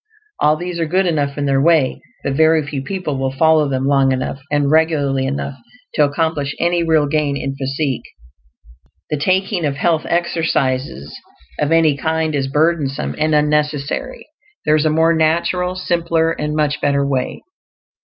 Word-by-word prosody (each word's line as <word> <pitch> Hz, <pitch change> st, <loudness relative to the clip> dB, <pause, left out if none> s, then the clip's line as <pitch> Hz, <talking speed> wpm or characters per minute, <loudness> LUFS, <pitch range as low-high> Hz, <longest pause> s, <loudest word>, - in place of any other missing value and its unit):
All 150 Hz, +1 st, +3 dB
these 175 Hz, +1 st, -5 dB
are 165 Hz, -, 0 dB
good 185 Hz, +4 st, +1 dB
enough 145 Hz, -5 st, -1 dB
in 145 Hz, -, -1 dB
their 135 Hz, -1 st, +2 dB
way, 160 Hz, -3 st, +2 dB, 0.2 s
but 140 Hz, -, -1 dB
very 160 Hz, +1 st, +3 dB
few 145 Hz, -1 st, -4 dB
people 150 Hz, -2 st, -4 dB
will 135 Hz, 0 st, -1 dB
follow 155 Hz, +1 st, +3 dB
them 130 Hz, -1 st, -1 dB
long 135 Hz, -1 st, +3 dB
enough 130 Hz, +1 st, -3 dB
and 145 Hz, -1 st, +1 dB
regularly 145 Hz, -4 st, +2 dB
enough 140 Hz, 0 st, -4 dB, 0.3 s
to 150 Hz, -, +3 dB
accomplish 145 Hz, -1 st, -1 dB
any 175 Hz, 0 st, +1 dB
real 160 Hz, -3 st, +2 dB
gain 145 Hz, -1 st, 0 dB
in 135 Hz, -1 st, -4 dB
physique. 135 Hz, 0 st, -2 dB, 1.1 s
The 150 Hz, -, 0 dB
taking 185 Hz, +4 st, 0 dB
of 145 Hz, -2 st, -1 dB
"health 160 Hz, +1 st, 0 dB
exercises" 135 Hz, -, -1 dB, 0.4 s
of 145 Hz, -, 0 dB
any 165 Hz, -3 st, +4 dB
kind 160 Hz, +3 st, -1 dB
is 135 Hz, -2 st, -1 dB
burdensome 150 Hz, -1 st, 0 dB
and 155 Hz, 0 st, +2 dB
unnecessary; 150 Hz, -, -1 dB, 0.4 s
there 150 Hz, -, +4 dB
is 155 Hz, 0 st, +1 dB
a -, -, +3 dB
more 160 Hz, +2 st, +3 dB
natural, 170 Hz, +3 st, +1 dB
simpler, 170 Hz, -2 st, 0 dB
and 150 Hz, -2 st, -3 dB
much 150 Hz, -1 st, 0 dB
better 140 Hz, -1 st, +1 dB
way. 135 Hz, -2 st, -2 dB
150 Hz, 165 wpm, -18 LUFS, 140-165 Hz, 1.1 s, any